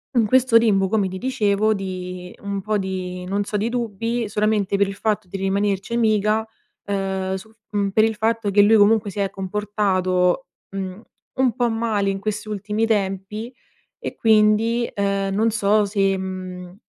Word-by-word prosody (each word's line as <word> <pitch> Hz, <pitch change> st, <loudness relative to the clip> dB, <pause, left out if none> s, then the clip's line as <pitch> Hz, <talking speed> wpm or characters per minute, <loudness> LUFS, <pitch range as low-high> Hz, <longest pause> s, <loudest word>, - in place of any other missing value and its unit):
in 235 Hz, -2 st, +4 dB
questo 255 Hz, 0 st, +5 dB
limbo 195 Hz, -4 st, +3 dB
come 205 Hz, -3 st, +1 dB
ti 185 Hz, -, -6 dB
dicevo 215 Hz, -3 st, +1 dB
di 185 Hz, -2 st, -6 dB
un 200 Hz, -1 st, -3 dB
po' 215 Hz, +2 st, 0 dB
di 185 Hz, -2 st, -4 dB
non 200 Hz, +2 st, -1 dB
so, 210 Hz, -, -5 dB
di 210 Hz, +3 st, 0 dB
dubbi, 230 Hz, 0 st, -2 dB
solamente 210 Hz, -1 st, 0 dB
per 200 Hz, 0 st, +2 dB
il 195 Hz, -, -6 dB
fatto 215 Hz, -1 st, -1 dB
di 195 Hz, -, -5 dB
rimanerci 195 Hz, +2 st, -1 dB
amica, 215 Hz, -1 st, +2 dB, 0.4 s
ehm, 190 Hz, -1 st, -2 dB
sul 220 Hz, +4 st, -10 dB
f 220 Hz, -, -40 dB, 0.2 s
mhmm, 200 Hz, -1 st, +1 dB
per 215 Hz, +2 st, +4 dB
il 225 Hz, 0 st, +1 dB
fatto 225 Hz, 0 st, 0 dB
che 205 Hz, +1 st, +5 dB
lui 215 Hz, +2 st, +5 dB
comunque 210 Hz, 0 st, +4 dB
si 205 Hz, -, -6 dB
è 195 Hz, -1 st, +1 dB
comportato, 190 Hz, 0 st, 0 dB, 0.2 s
mhmm, 190 Hz, 0 st, -5 dB, 0.3 s
un 255 Hz, -4 st, +2 dB
po' 245 Hz, -1 st, +1 dB
male 225 Hz, -3 st, 0 dB
in 195 Hz, -, -1 dB
questi 215 Hz, +1 st, -4 dB
ultimi 210 Hz, +2 st, -1 dB
tempi 210 Hz, +2 st, -2 dB, 0.5 s
e -, -, -5 dB
quindi, 220 Hz, +2 st, +3 dB
ehm, 200 Hz, -1 st, 0 dB
non 220 Hz, +3 st, +3 dB
so 210 Hz, -1 st, +2 dB
se, 195 Hz, -1 st, +1 dB
mhmm, 185 Hz, -1 st, -6 dB
205 Hz, 175 wpm, -22 LUFS, 195-220 Hz, 0.5 s, questo